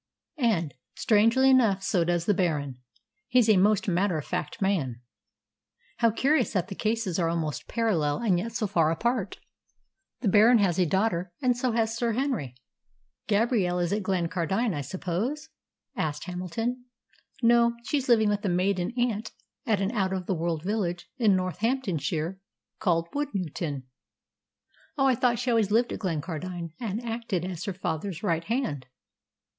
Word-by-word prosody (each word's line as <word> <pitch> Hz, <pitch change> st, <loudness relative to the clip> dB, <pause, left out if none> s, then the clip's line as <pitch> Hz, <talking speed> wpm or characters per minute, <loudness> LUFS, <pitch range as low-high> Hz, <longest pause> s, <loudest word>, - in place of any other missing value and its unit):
"And, 180 Hz, -, +1 dB, 0.2 s
strangely 230 Hz, +5 st, +4 dB
enough, 220 Hz, -7 st, +3 dB
so 180 Hz, -3 st, +2 dB
does 170 Hz, 0 st, 0 dB
the 205 Hz, -, +3 dB
Baron. 150 Hz, -8 st, -1 dB, 0.5 s
He's 245 Hz, -2 st, +4 dB
a 215 Hz, -, +6 dB
most 205 Hz, +2 st, +3 dB
matter 185 Hz, -1 st, +1 dB
of 150 Hz, -, -5 dB
fact -, -, -4 dB
man." 165 Hz, -, 0 dB, 1.0 s
"How 230 Hz, -, +4 dB
curious 265 Hz, +3 st, +1 dB
that 185 Hz, -3 st, -1 dB
the -, -, -4 dB
cases 215 Hz, -3 st, -1 dB
are 165 Hz, -2 st, +1 dB
almost 160 Hz, -3 st, -3 dB
parallel, 170 Hz, -11 st, 0 dB
and 195 Hz, -7 st, +1 dB
yet 225 Hz, +5 st, -4 dB
so 220 Hz, -, -1 dB
far 170 Hz, -6 st, +2 dB
apart! 215 Hz, +4 st, -1 dB, 0.8 s
The 240 Hz, -, 0 dB
Baron 215 Hz, +5 st, +6 dB
has 190 Hz, -4 st, +2 dB
a 180 Hz, -, +3 dB
daughter, 185 Hz, -1 st, 0 dB
and 250 Hz, -2 st, +2 dB
so 245 Hz, -1 st, -1 dB
has 225 Hz, -1 st, 0 dB
Sir 230 Hz, -1 st, 0 dB
Henry." 235 Hz, -, -2 dB, 0.7 s
"Gabrielle 205 Hz, -4 st, +2 dB
is 175 Hz, +1 st, 0 dB
at 210 Hz, -, 0 dB
Glencardine, 185 Hz, +3 st, 0 dB
I 145 Hz, -, -3 dB
suppose?" 200 Hz, -, -3 dB, 0.5 s
asked 150 Hz, -1 st, -2 dB
Hamilton. 225 Hz, +8 st, -3 dB, 0.6 s
"No, 235 Hz, 0 st, +5 dB
she's 270 Hz, 0 st, -1 dB
living 220 Hz, -3 st, +5 dB
with 205 Hz, 0 st, -1 dB
a 200 Hz, -, 0 dB
maiden 180 Hz, +3 st, 0 dB
aunt 230 Hz, -3 st, -1 dB, 0.4 s
at 210 Hz, -4 st, +2 dB
an 195 Hz, +2 st, 0 dB
out 190 Hz, -5 st, 0 dB
of 185 Hz, -1 st, -3 dB
the 190 Hz, -, 0 dB
world 165 Hz, -2 st, -2 dB
village 180 Hz, -3 st, -2 dB
in 215 Hz, -5 st, +4 dB
Northamptonshire 185 Hz, -, -1 dB, 0.4 s
called 170 Hz, -2 st, +1 dB
Woodnewton." 180 Hz, -, -3 dB, 1.1 s
"Oh, 270 Hz, -, +3 dB
I 265 Hz, -, +5 dB
thought 240 Hz, 0 st, +2 dB
she 250 Hz, +1 st, -1 dB
always 225 Hz, -4 st, +2 dB
lived 230 Hz, +3 st, +2 dB
at -, -, -5 dB
Glencardine, 170 Hz, -1 st, -4 dB
and 230 Hz, 0 st, -4 dB
acted 225 Hz, -6 st, -2 dB
as 180 Hz, -2 st, -5 dB
her 195 Hz, -, -2 dB
father's 175 Hz, +1 st, -4 dB
right 165 Hz, -4 st, 0 dB
hand." 220 Hz, -, -2 dB
195 Hz, 160 wpm, -27 LUFS, 175-230 Hz, 1.1 s, a